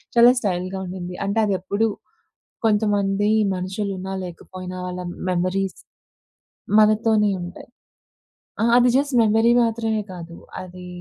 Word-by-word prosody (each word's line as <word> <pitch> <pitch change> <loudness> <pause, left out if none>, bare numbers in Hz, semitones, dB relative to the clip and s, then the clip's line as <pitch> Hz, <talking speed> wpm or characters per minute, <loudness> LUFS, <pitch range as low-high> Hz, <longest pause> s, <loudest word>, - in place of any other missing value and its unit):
చాలా 240 +1 +8
స్టైల్‌గా 185 -2 -2
ఉండింది. 180 0 -6
అంటే 200 +3 0
అదెప్పుడు 200 +3 0 0.8
కొంతమంది 205 -1 +2 0.2
మనుషులున్నా, 190 +1 -4
లేకపోయినా 185 +1 -8
వాళ్ళ 180 0 -5 0.3
మెమోరీస్ 185 +2 -1 1.0
మనతోనే 215 0 +4
ఉంటాయి. 175 +1 -9 0.9
ఆ! - - +3
అది 245 0 +5
జస్ట్ 280 -1 0
మెమరీ 225 +2 +4
మాత్రమే 225 -1 -1
కాదు. 170 -1 -9 0.3
అది 180 0 -10
195 Hz, 105 wpm, -22 LUFS, 185-220 Hz, 1.0 s, చాలా